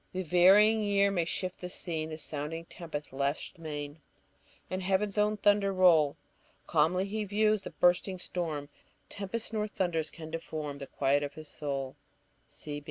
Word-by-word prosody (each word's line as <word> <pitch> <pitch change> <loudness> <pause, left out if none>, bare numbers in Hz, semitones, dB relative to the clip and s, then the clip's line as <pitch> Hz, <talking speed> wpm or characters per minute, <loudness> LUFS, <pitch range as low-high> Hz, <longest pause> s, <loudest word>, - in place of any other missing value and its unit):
The 185 0 -2
varying 195 +6 +6
year 200 -1 +3
may 175 -4 +1
shift 185 +1 -3
the 180 - -5
scene, 160 -4 -3
The 155 - -5
sounding 155 +2 -4
tempest 155 -6 -7
lash 140 +2 -2
the 165 - -19
main, 150 -1 -6 0.7
And 185 0 -3
heaven's 195 +2 +1
own 210 0 +2
thunder 205 -1 +3
roll; 165 -6 +5 0.5
Calmly 170 +4 +2
he 215 +2 -2
views 215 +1 +2
the - - -7
bursting 180 +2 +2
storm, 160 -5 -3 0.4
Tempests 210 +3 -4
nor 215 -1 0
thunders 175 -6 -1
can 160 -1 -10
deform 155 -3 -5
The 140 - -7
quiet 140 +2 +1
of 145 -1 -4
his 155 0 -9
soul." 140 -2 -4
175 Hz, 160 wpm, -30 LUFS, 150-195 Hz, 0.7 s, varying